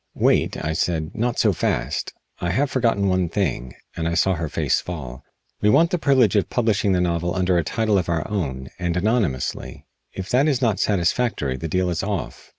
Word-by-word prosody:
"Wait," -, -, +2 dB
I 80 Hz, -, -1 dB
said; 80 Hz, -1 st, -1 dB
"not 120 Hz, +2 st, -1 dB
so 105 Hz, -3 st, +3 dB
fast. 65 Hz, -4 st, -1 dB, 0.3 s
I 90 Hz, -, -2 dB
have 135 Hz, +10 st, 0 dB
forgotten 115 Hz, -6 st, +1 dB
one 90 Hz, -2 st, +1 dB
thing," 70 Hz, -10 st, -2 dB, 0.2 s
and 80 Hz, -1 st, -2 dB
I 85 Hz, -, -1 dB
saw 95 Hz, +3 st, +3 dB
her 80 Hz, -3 st, -3 dB
face -, -, 0 dB
fall. 70 Hz, -8 st, -7 dB, 0.4 s
"We 105 Hz, -, +4 dB
want 160 Hz, +8 st, +4 dB
the 180 Hz, -, 0 dB
privilege 130 Hz, -8 st, +3 dB
of 100 Hz, -, +2 dB
publishing 110 Hz, -4 st, +1 dB
the 90 Hz, -, +2 dB
novel 85 Hz, 0 st, -1 dB
under 90 Hz, -1 st, +1 dB
a -, -, 0 dB
title 105 Hz, +4 st, +1 dB
of 90 Hz, -, -4 dB
our 80 Hz, -2 st, -1 dB
own, 70 Hz, -11 st, -3 dB
and 85 Hz, -1 st, -1 dB
anonymously. 95 Hz, -, -1 dB, 0.3 s
If 95 Hz, 0 st, -6 dB
that 135 Hz, +4 st, +3 dB
is 140 Hz, -5 st, +2 dB
not 110 Hz, -7 st, +1 dB
satisfactory 95 Hz, -, 0 dB
the 65 Hz, +5 st, -5 dB
deal 90 Hz, +3 st, 0 dB
is 85 Hz, -, -1 dB
off." 100 Hz, -4 st, -4 dB
95 Hz, 200 wpm, -22 LUFS, 85-110 Hz, 0.4 s, We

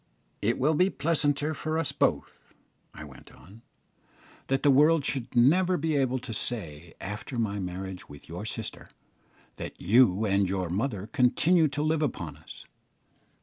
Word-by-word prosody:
"It 115 Hz, +4 st, +1 dB
will 150 Hz, +5 st, +2 dB
be 180 Hz, +5 st, +3 dB
pleasanter 150 Hz, -1 st, 0 dB
for 155 Hz, +1 st, -3 dB
us 165 Hz, -4 st, -1 dB
both," -, -, -2 dB, 0.4 s
I 75 Hz, -, -10 dB
went 70 Hz, -3 st, -14 dB
on, 105 Hz, +5 st, -16 dB, 0.9 s
"that 135 Hz, 0 st, 0 dB
the 145 Hz, -, +6 dB
world 150 Hz, +2 st, +4 dB
should 130 Hz, -4 st, -3 dB
never 175 Hz, +9 st, +4 dB
be 160 Hz, 0 st, -1 dB
able 130 Hz, -2 st, +1 dB
to 125 Hz, -2 st, -7 dB
say, 85 Hz, -9 st, -4 dB
after 105 Hz, +7 st, -6 dB
my 105 Hz, -3 st, -1 dB
marriage 95 Hz, 0 st, -6 dB
with 70 Hz, -1 st, -13 dB
your 85 Hz, +4 st, -7 dB
sister, 110 Hz, -1 st, -6 dB, 0.7 s
that -, -, -7 dB
you 110 Hz, 0 st, +4 dB
and 100 Hz, -2 st, +1 dB
your 95 Hz, -3 st, -2 dB
mother 105 Hz, 0 st, -2 dB
continue 155 Hz, +7 st, +3 dB
to 145 Hz, +1 st, -3 dB
live 155 Hz, 0 st, +1 dB
upon 85 Hz, -, -3 dB
us. 80 Hz, +1 st, -13 dB
120 Hz, 155 wpm, -27 LUFS, 95-150 Hz, 0.9 s, the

